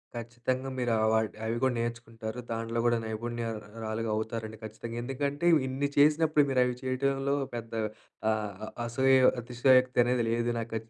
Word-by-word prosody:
ఖచ్చితంగా 120 +3 -3
మీరు 120 -2 0
అవ్ 110 0 +3
అవ్ 110 - 0 0.2
అవి 115 +1 -1
కూడా 130 -1 +3
నేర్చుకుంటారు. 115 -1 -4
దాంట్లో 115 +1 -2
కూడా 120 -1 +4
నైపుణ్యరాలుగా 110 -1 -4
అవుతారండి 110 0 -4
ఖచ్చితంగా. 110 +2 -7
ఎందుకంటే 140 +5 -2 0.2
ఇన్ని 135 +2 -1
చేసినప్పుడు, 150 +1 +5
మీరు 130 -1 +3
అవి 125 0 -1
చేయడంలో 135 +2 0 0.2
పెద్ద 115 -1 -6 0.6
ఆహ్, 105 -1 -3 0.2
అసోయ 130 +3 +3 0.3
అతిశయోక్తి 125 +1 +4
అనేది 125 -1 +1
లేదు 120 +1 +1
నాకు. 115 0 -5
120 Hz, 140 wpm, -29 LUFS, 115-130 Hz, 0.6 s, చేసినప్పుడు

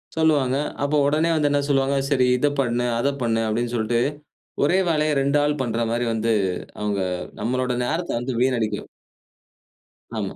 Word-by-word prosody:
சொல்லுவாங்க, 145 -5 +2 0.3
அப்போ 150 +1 +1
உடனே 155 +3 +2
வந்து 150 -2 +2
என்ன 145 0 +2
சொல்லுவாங்க, 135 0 +2
சரி 130 -3 +3
இத 145 - +2
பண்ணு. 120 -2 +1
அத 140 - +2
பண்ணு 115 -1 +1
அப்பபிடின்னு 115 +2 -1
சொல்லிட்டு, 115 +1 +1 0.6
ஒரே 175 +6 +3
வேலைய 155 -1 +2
2 140 +2 +2
ஆள் 150 -1 0
பண்றமாரி 115 0 -1
வந்து, 115 0 +1 0.5
அவுங்க 105 -2 -1 0.4
நம்மளோட 125 +3 0
நேரத்த 170 +6 -2
வந்து 125 +1 -3
வீணடிக்கும். 125 -4 0 1.3
ஆமா. - - -3
130 Hz, 145 wpm, -23 LUFS, 120-145 Hz, 1.3 s, சரி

